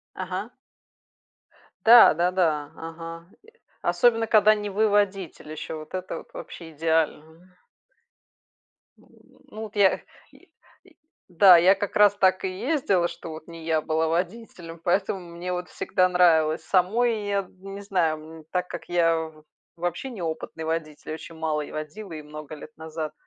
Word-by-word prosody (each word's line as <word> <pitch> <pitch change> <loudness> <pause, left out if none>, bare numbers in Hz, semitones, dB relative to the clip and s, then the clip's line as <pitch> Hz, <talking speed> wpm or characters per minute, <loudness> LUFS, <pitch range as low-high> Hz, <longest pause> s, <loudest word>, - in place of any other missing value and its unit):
Ага. 185 +4 -4 1.4
Да 235 -4 +9
да-да, 170 -4 0
ага. 165 +1 -8 0.2
И 455 +2 -20 0.3
особенно, 230 -2 +2
когда 215 -1 +6
не 205 -1 -4
вы 215 +2 +2
водитель 195 -6 -1
еще, 155 +1 -6
вот 155 +2 -10
это 185 0 -4
вот - - -13
вообще 165 -2 -9
идеально. 160 +2 -2 1.5
М, - - -23 0.5
ну 215 - -8
вот 215 -1 -9
я 200 -2 +3 0.3
й - - -19
й - - -24 0.8
да, 180 0 +8
я 185 +4 +5
как 200 0 -4
раз 205 -1 +6
так 185 -1 +2
и - - 0
ездила, 215 - +1
что 170 -1 -9
вот 155 +1 -9
не 165 -1 -10
я 160 -1 +1
была 160 +1 0
водителем, 170 -1 -4
поэтому 190 +2 0
мне 175 +1 -6
вот 180 0 -4
всегда 185 0 +1
нравилось. 160 -3 +3
Самой 215 +4 +1
я, 200 0 +1
м, 195 +1 -9
не 200 - -7
знаю, 175 -6 0 0.2
м, - - -15
так 180 0 -1
как - - -8
я 165 -1 +3
в 160 -1 -6 0.3
вообще 175 +9 -3
неопытный 160 -5 -5
водитель, 155 -2 -4
очень 160 +1 -9
мало 155 -1 -1
я - - -8
водила 160 +6 -7
и 155 - -6
много 150 0 -9
лет 155 +1 -12
назад, 160 -1 -6
175 Hz, 155 wpm, -25 LUFS, 160-195 Hz, 1.5 s, Да